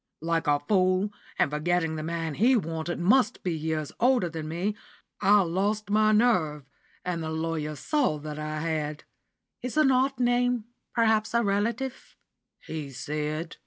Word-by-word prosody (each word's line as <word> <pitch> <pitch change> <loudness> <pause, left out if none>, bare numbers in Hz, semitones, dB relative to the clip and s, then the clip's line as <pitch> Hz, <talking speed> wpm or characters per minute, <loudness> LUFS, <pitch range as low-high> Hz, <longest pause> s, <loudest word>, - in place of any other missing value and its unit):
Like 165 -1 0
a 145 0 +3
fool, 185 +4 +2 0.3
and - - +2
forgetting 165 +1 0
the 155 - -4
man 165 0 -3
he 240 - +4
wanted 165 -4 -2
must 220 +6 +3
be 180 - 0
years 155 -1 -2
older 245 -7 +3
than 160 -1 -5
me, 180 +6 -2 0.5
I 205 +1 +6
lost 200 +4 -1
my 215 0 +4
nerve, 180 - +2 0.4
and 175 -2 -2
the 160 - -3
lawyer 160 -1 -2
saw 265 - 0
that 150 0 -7
I 155 0 -3
had. 155 -2 -2 0.6
'It's 250 +4 -4
an 300 -3 +5
odd 260 0 +2
name 245 -1 +2 0.3
perhaps 220 -1 +2
a 235 - +4
relative?' 230 +6 -2 0.5
he 155 -3 -5
said. 150 +5 -4
175 Hz, 155 wpm, -27 LUFS, 155-220 Hz, 0.6 s, I